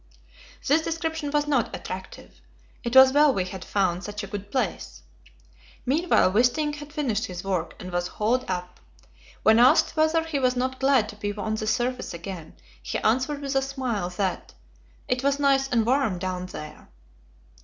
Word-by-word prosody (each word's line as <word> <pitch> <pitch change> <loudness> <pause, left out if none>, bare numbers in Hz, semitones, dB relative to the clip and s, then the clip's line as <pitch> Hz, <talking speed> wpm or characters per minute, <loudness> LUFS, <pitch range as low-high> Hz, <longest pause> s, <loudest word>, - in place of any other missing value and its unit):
This 295 +4 +4
description 320 -2 -3
was 295 0 +1
not 275 -6 0
attractive; 185 - -9 0.4
it 235 +1 -3
was 265 0 +9
well 295 0 +6
we 190 -7 -1
had 185 0 -7
found 185 -2 0
"such 210 0 -5
a - - -3
good 200 0 -7
place." 260 - -3 0.8
Meanwhile 290 - +3
Wisting 250 +8 +2
had 295 0 -10
finished 240 -8 -1
his 180 -1 -7
work, 185 -4 -2
and 180 - -7
was 175 0 -1
hauled 240 +4 0
up. 180 -1 -4 0.6
When 220 +1 +6
asked 250 +6 +5
whether 315 +1 +2
he 320 -3 -2
was 255 -1 +2
not 260 +1 -2
glad 265 -5 +3
to 210 - -9
be 205 -1 -3
on 215 +1 -3
the 215 0 -3
surface 245 -2 -1
again, 170 -1 -8 0.3
he - - -3
answered 260 +6 0
with 275 -1 -3
a 270 - +4
smile 255 -9 -3
that 185 +1 -3 0.5
"it 250 -1 -1
was 280 0 +1
nice 275 -1 +3
and 230 -3 +2
warm 245 -6 +1
down 185 0 -4
there." 155 -4 -10
245 Hz, 175 wpm, -25 LUFS, 195-280 Hz, 0.8 s, was